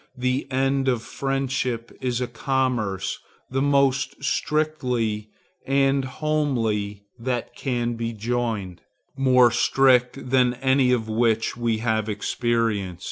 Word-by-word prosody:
The 125 +2 -1
end 135 +1 +1
of 120 -3 +1
friendship 130 -4 -2
is 125 -1 -1
a - - +1
commerce 125 -10 -1 0.3
the 135 +1 0
most 140 -1 +1
strict 155 +1 0 0.8
and 135 0 +2
homely 120 -9 -1 0.2
that 120 0 -3
can 120 -3 -1
be 115 0 -3
joined; 110 -5 -3 0.3
more 125 -3 +5
strict 125 +1 +2
than 125 -2 +3
any 130 0 +2
of 115 -3 +1
which 115 0 +1
we 120 -2 0
have 110 -1 0
experience. 105 -3 -1
125 Hz, 115 wpm, -24 LUFS, 115-135 Hz, 0.8 s, more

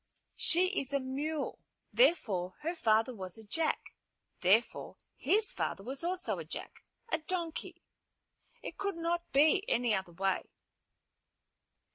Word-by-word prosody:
"She 360 +2 +5
is 275 +1 +1
a 280 - +2
mule. 280 +3 -3 0.3
Therefore, 200 - +2
her 330 +3 -2
father 225 -5 +2
was 185 -4 -7
a 220 - -10
jack. 315 +10 -1 0.5
Therefore 200 +6 +2 0.2
his 425 +2 +3
father 195 - -3
was 265 +7 -2
also 360 +1 -1
a - - -5
jack, - - -6 0.3
a 320 - +1
donkey. 335 0 -4 0.8
It - - -8
could 400 -3 -2
not 340 +1 -2
be 305 +8 +4
any 240 -2 +2
other 190 -3 -2
way." 190 +2 -1
280 Hz, 130 wpm, -32 LUFS, 215-340 Hz, 0.8 s, She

